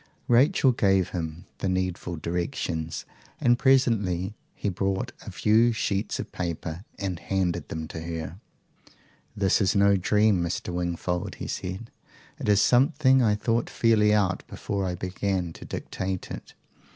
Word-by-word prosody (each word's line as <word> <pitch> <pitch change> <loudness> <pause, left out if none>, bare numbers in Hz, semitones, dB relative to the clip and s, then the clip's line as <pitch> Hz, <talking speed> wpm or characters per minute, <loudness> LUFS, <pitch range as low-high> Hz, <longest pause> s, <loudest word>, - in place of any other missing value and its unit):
Rachel 130 +2 +5
gave 95 -6 +2
him 80 -1 -5
the 95 - -1
needful 90 -1 -2
directions, 85 - -3 0.3
and 120 0 +3
presently 105 -8 +2 0.2
he - - -3
brought 95 0 -1 0.2
a - - -5
few 115 +3 +3
sheets 100 -2 -1
of - - -5
paper, 85 0 -4
and 95 -4 -3
handed 90 -2 -1
them 80 0 -4
to 85 - -6
her. 80 +1 -5 1.0
"This 100 +1 +3
is 100 +2 +2
no 100 0 +5
dream, 105 0 +3
Mr. 85 +1 -3
Wingfold," 90 0 -2
he - - -6
said. 95 +5 -5 0.5
"It - - -2
is 105 -1 +5
something 135 +1 +4
I 105 -3 +3
thought 115 +2 0
fairly 110 -2 +3
out 100 -3 +2
before 100 -1 -3
I 90 - -2
began 90 -1 -2
to - - -11
dictate 95 -1 -4
it. - - -8
95 Hz, 145 wpm, -26 LUFS, 90-105 Hz, 1.0 s, Rachel